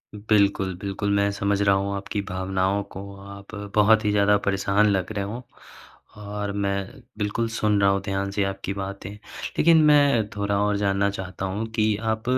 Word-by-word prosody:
बिल्कुल, 100 -2 +1
बिल्कुल 100 +1 -2
मैं 100 0 +2
समझ 100 0 0
रहा 100 -1 +4
हूँ 100 +1 -1
आपकी 100 +1 -3
भावनाओं 95 +2 0
को 95 - -5 0.2
आप 100 +1 -11 0.2
बहुत 110 +1 +5
ही 105 - +2
ज़्यादा 105 0 +4
परेशान 100 +1 +2
लग 95 0 0
रहे 100 -2 -2
हो, 115 +5 -6 0.7
और 105 0 -4
मैं 100 +4 -3 0.2
बिल्कुल 105 +2 -1
सुन 105 -2 +1
रहा 100 - +5
हूँ 100 0 +1
ध्यान 100 0 -2
से 100 0 0
आपकी 95 0 -3
बातें, 100 +1 -6 0.5
लेकिन 165 -1 +6
मैं 145 -7 +4
थोड़ा 100 -1 0
और 105 0 +1
जानना 100 0 +1
चाहता 95 -1 -5
हूँ 100 +4 -3
कि 110 -1 +2 0.2
आप 110 0 -7
100 Hz, 175 wpm, -24 LUFS, 100-105 Hz, 0.7 s, लेकिन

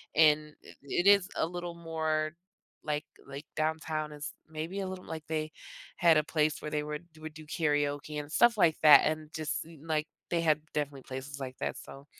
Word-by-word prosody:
and 150 -1 +5
it - - -15
it 175 +7 0
is 200 -2 +7
a - - +1
little 175 0 -5
more 160 -2 -1 0.5
like 150 -1 -2 0.2
like 140 +2 -7
downtown 155 -1 -1
is 145 0 -6 0.2
maybe 160 +5 -4
a 190 - -2
little 185 -1 -6
like 160 -1 -6
they 155 -1 -2 0.5
had 170 -2 +6
a 150 - +3
place 155 -1 0
where 150 - -5
they 150 -1 0
would 150 +3 -5
would 155 0 -7
do 155 0 -11
karaoke 145 -1 0
and 145 +1 -7
stuff 235 +2 +5
like 160 -3 +5
that, 150 -1 +9
and 155 0 -2
just, 155 -2 -2
n 160 -2 -14
like, 155 0 0 0.2
they 170 -1 +1
had 155 -2 +3
definitely 145 -3 -2
places 135 +2 -7
like 130 -1 -6
that, - - -2
so 135 +1 -11
155 Hz, 195 wpm, -31 LUFS, 150-160 Hz, 0.5 s, that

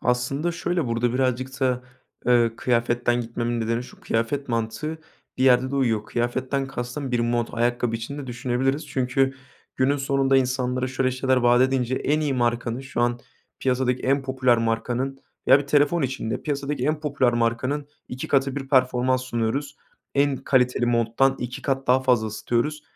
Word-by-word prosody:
Aslında 135 +7 0
şöyle, 175 -3 -1
burada 120 +1 0
birazcık 130 +1 -1
da, 125 -1 +1 0.4
ııı, 120 -2 +3
kıyafetten 120 0 +1
gitmemin 120 0 -2
nedeni 115 +2 -1
şu: 125 - -14
Kıyafet 125 +5 -1
mantığı 115 +8 -2 0.4
bir 130 - +2
yerde 130 0 +4
de 140 - -2
uyuyor. 115 -6 +1
Kıyafetten 130 +3 -1
kastım 130 +1 -5
bir 120 - +2
mont. 120 0 -1
Ayakkabı 120 0 0
için 120 +6 -6
de 140 - -6
düşünebiliriz. 130 +4 -1
Çünkü 135 0 +1 0.4
günün 135 +2 +2
sonunda 135 -1 +2
insanlara 130 0 0
şöyle 130 0 0
şeyler 130 +1 +1
vaat 120 0 +4
edince 130 -1 +1
en 150 +3 0
iyi 145 -3 0
markanın, 120 0 0
şu 135 -2 -4
an 120 0 +1 0.4
piyasadaki 125 -1 0
en 135 +1 +2
popüler 130 -2 +2
markanın 120 +4 -1 0.3
veya 135 - +8
bir 145 - -5
telefon 145 +3 +3
için 130 -4 -2
de - - -3
piyasadaki 140 -2 -2
en 150 +1 0
popüler 140 -5 +1
markanın 125 +5 -1 0.2
2 125 +1 -6
katı 135 0 +1
bir 135 -1 -5
performans 130 -1 +2
sunuyoruz. 130 +4 -2 0.4
En 140 -1 +2
kaliteli 125 -2 +1
monttan 120 +3 +2
2 125 0 -5
kat 135 -1 -1
daha 125 +1 +4
fazla 125 -4 +2
ısıtıyoruz 120 +7 -2
130 Hz, 165 wpm, -24 LUFS, 120-135 Hz, 0.4 s, veya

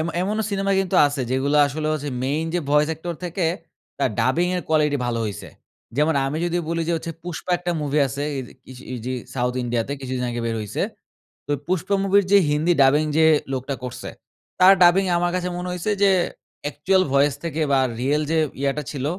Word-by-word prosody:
M 160 - -1
এমনও 210 +3 -1
cinema 195 0 0
কিন্তু 190 -2 -3
আছে 145 -1 -3
যেগুলো 135 +3 +1
আসলে 150 +2 -4
হচ্ছে 150 -1 -3 0.2
মেইন 145 +4 0
যে 175 - +1
ভয়েস 150 +1 +4
অ্যাক্টর 160 +2 -4
থেকে 175 +1 -2 0.5
তার 140 - +1
ডাবিংয়ের 175 +9 +1
কোয়ালিটি 150 -2 +2
ভালো 120 -1 -1
হইছে। 105 -2 -6 0.5
যেমন 150 +2 +2
আমি 140 +3 -2
যদি 175 0 0
বলি 165 0 -1
যে - - +2
হচ্ছে, 165 +1 -5
'Pushpa' 175 +1 -4
একটা 175 +1 -3
মুভি 145 0 0
আছে। 135 +2 -4 0.2
এদে 130 - -7
কিসে 130 0 -12
ইজি 125 +1 -4 0.2
সাউথ 125 -1 -1
ইন্ডিয়াতে। 120 +2 -2
কিছুদিন 130 -1 -3
আগে 120 0 -3
বের 115 - -1
হইছে। 105 -2 -3 0.6
তো 145 - -1
'Pushpa' 185 +3 0
মুভির 200 +1 +4
যে 200 - +8
হিন্দি 155 +4 +2
ডাবিং 145 +3 +4
যে 160 - +6 0.3
লোকটা 135 +1 -3
করছে, 125 - -6 0.5
তার 185 +1 +9
ডাবিং 180 +2 +6
আমার 175 0 +1
কাছে 180 0 -2
মনে 180 +1 -4
হইছে 180 +4 -2
যে 200 - +6 0.5
অ্যাকচুয়াল 170 +6 +1
ভয়েস 140 0 +3
থেকে 160 -1 -3
বা, 135 - +4 0.2
রিয়েল 145 +4 +1
যে 165 - +2 0.2
ইয়াটা 140 +2 0
ছিল 140 -3 -5
150 Hz, 190 wpm, -22 LUFS, 135-175 Hz, 0.6 s, তার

